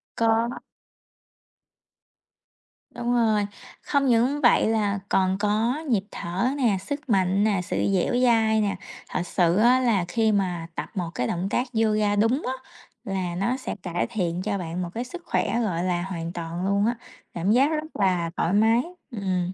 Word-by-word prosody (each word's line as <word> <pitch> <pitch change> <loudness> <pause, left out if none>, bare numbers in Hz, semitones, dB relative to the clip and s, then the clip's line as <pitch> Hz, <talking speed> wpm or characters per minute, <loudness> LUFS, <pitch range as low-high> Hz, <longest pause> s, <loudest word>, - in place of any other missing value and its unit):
Có. 225 0 +2 2.4
Đúng 240 0 -1
rồi, 220 -4 +2 0.4
không 280 -1 +1
những 250 +4 +2
vậy 240 -4 +5
là 205 -3 +1
còn 190 0 +2
có 215 +5 +1
nhịp 215 -6 +2
thở 180 +7 -2
nè, 235 -8 +2
sức 285 +6 -6
mạnh 195 -1 +2
nè, 205 -4 +2
sự - - -3 0.2
dẻo 185 +3 +1
dai 220 -3 +3
nè. 200 -2 0 0.3
Thật - - -2
sự 175 -2 +2
á, 240 +4 +5
là 225 -8 +2
khi 220 +4 +1
mà 180 -5 -1
tập - - -4
một 175 -4 -2
cái 125 - -1
động 175 +6 -2
tác 245 +5 0 0.2
yoga 215 -1 +2
đúng 225 +7 +2
á, 255 - -1 0.5
là 185 -3 -3
nó 235 +8 0
sẽ 260 - -5
cải 175 -1 -1
thiện 180 -6 -2
cho 200 +1 -1
bạn 175 -1 -4
một 175 - -3
cái 235 - -3
sức 345 +8 -9
khỏe, 235 - 0
gọi 180 -6 -1
là, 180 -1 0
hoàn 170 -2 -5
toàn 170 +1 -4
luôn 200 +1 +2
á, 235 +2 +1 0.4
cảm 175 +4 0
giác 255 +5 +5
rất 310 0 -4
là 180 -4 +1
thoải 170 - +1
mái. 225 +3 +4 0.3
Ừm, 185 -5 -2
205 Hz, 175 wpm, -25 LUFS, 180-235 Hz, 2.4 s, vậy